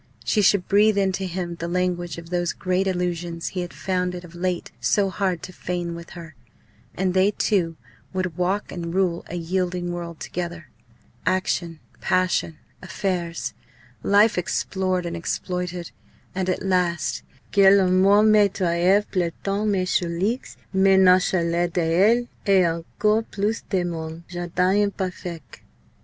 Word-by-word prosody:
She 215 - +2
should 195 -2 +3
breathe 210 +1 +4
into 190 -1 +1
him 175 -1 -4
the 170 - -3
language 175 -1 -1
of 170 +1 -10
those 175 0 0
great 185 +1 0
illusions 175 -2 -2
he 185 - -5
had 175 - -5
found 180 -1 -2
it 175 - -7
of 175 -1 -13
late 180 0 -2
so 195 -2 +2
hard 185 -3 -1
to 185 - -8
feign 175 -1 -3
with 170 0 -9
her; 165 -2 -9 0.6
and 185 -1 0
they 190 +2 +4
two 180 -5 0 0.3
would 185 -3 -2
walk 185 +4 -1
and 170 -1 -5
rule 180 -3 +1
a 175 - -6
yielding 175 +1 -2
world 170 -1 -6
together. 170 -4 -5 0.6
Action, 175 -3 0 0.2
passion, 185 -3 0 0.2
affairs 175 -2 -3 0.5
life 205 0 +4
explored 185 +1 -1
and 170 0 -3
exploited 180 +1 -3 0.4
and 185 0 -1
at 185 - -1
last 180 -4 0 0.3
"que 195 -1 +6
la 195 -1 +5
mort 195 +3 +5
me 210 -2 +5
treuve 185 +2 +2
plantant 195 +4 -1
mes 190 -3 +1
choulx 185 +7 -1 0.2
mais 190 0 +5
nonchalant 180 -2 +3
d'elle! 185 +8 +3 0.2
et 190 -2 +5
encore 170 +6 0
plus 210 +3 -1
de 185 -3 +1
mon 165 -1 -5
jardin 180 +3 +1
imparfaict!" 180 -5 -6
180 Hz, 145 wpm, -23 LUFS, 170-190 Hz, 0.6 s, que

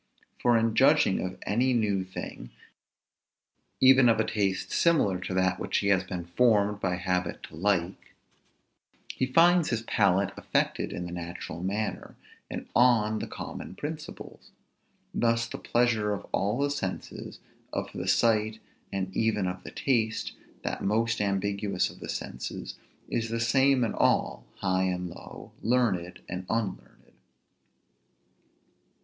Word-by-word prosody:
For 120 -1 +4
in 115 0 +1
judging 135 -5 +4
of 95 0 -4
any 125 +5 +2
new 105 -5 +1
thing, 95 -9 -8 1.3
even 130 -1 +7
of 115 - +3
a - - +4
taste 100 -3 -1
similar 130 - +3
to 90 - -5
that 95 0 +2
which - - -1
he 100 - +1
has 95 -2 +3
been 90 -2 -5
formed 105 +1 +2
by 95 -3 0
habit 90 -1 -2
to - - -10
like, 90 0 -1 1.0
he 130 - -1
finds 170 +4 +5
his 115 -2 -1
palate 100 -3 +2
affected - - -1
in 90 - -4
the 90 - -6
natural 85 -1 -6
manner, 105 +4 -3 0.3
and - - -6
on 110 -3 +4
the - - -4
common - - -7
principles. 150 +4 -8 0.6
Thus 115 0 +2
the - - -7
pleasure 115 -3 +1
of 100 - -5
all 100 +4 0
the 140 +1 +1
senses, 95 -10 -5 0.3
of - - -3
the - - -5
sight, 110 -1 +2 0.3
and 95 -1 -3
even 110 -3 +1
of 90 0 -4
the - - -7
taste, 115 -5 0 0.3
that - - -3
most 115 +2 +1
ambiguous 100 -1 0
of - - -15
the - - -8
senses, 60 - -5 0.3
is 115 -1 -2
the 115 0 -2
same 130 +2 +3
in 115 - -1
all, - - +1 0.2
high 95 -1 +1
and 90 -1 -2
low, - - -11
learned 100 -7 0
and 90 +1 -5
unlearned. 110 -4 -4
105 Hz, 145 wpm, -28 LUFS, 95-115 Hz, 1.3 s, even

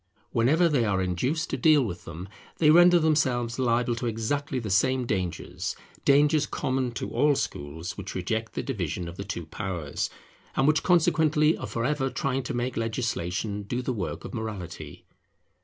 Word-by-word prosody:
Whenever 150 +10 +3
they 145 -7 +2
are 100 -3 +1
induced 125 - -1
to - - -1
deal 155 -4 +5
with 90 -5 -6
them, 85 +3 -7 0.3
they 150 -2 +5
render 175 +2 +7
themselves 130 -7 +1
liable 120 -1 +2
to 120 +1 -3
exactly 130 +5 -2
the 110 -5 -3
same 130 +6 +2
dangers, 95 -6 -3 0.3
dangers 145 +1 +4
common 130 -1 -1
to 115 - -5
all 145 -1 +3
schools 80 - -4
which 100 0 -6
reject 110 +5 -2
the - - -3
division 90 - -3
of 85 - -7
the 100 - -5
two 90 -4 -5
powers, 85 -4 -3 0.5
and 135 - +3
which 155 0 +4
consequently 160 -3 +3
are - - -6
for 115 0 -2
ever 135 -1 0
trying 135 0 -1
to 120 - -4
make 120 +1 -2
legislation 110 -3 -2
do 120 +5 -3
the 130 - -1
work 100 -6 -4
of - - -8
morality. 105 -7 -6
120 Hz, 175 wpm, -27 LUFS, 100-145 Hz, 0.5 s, render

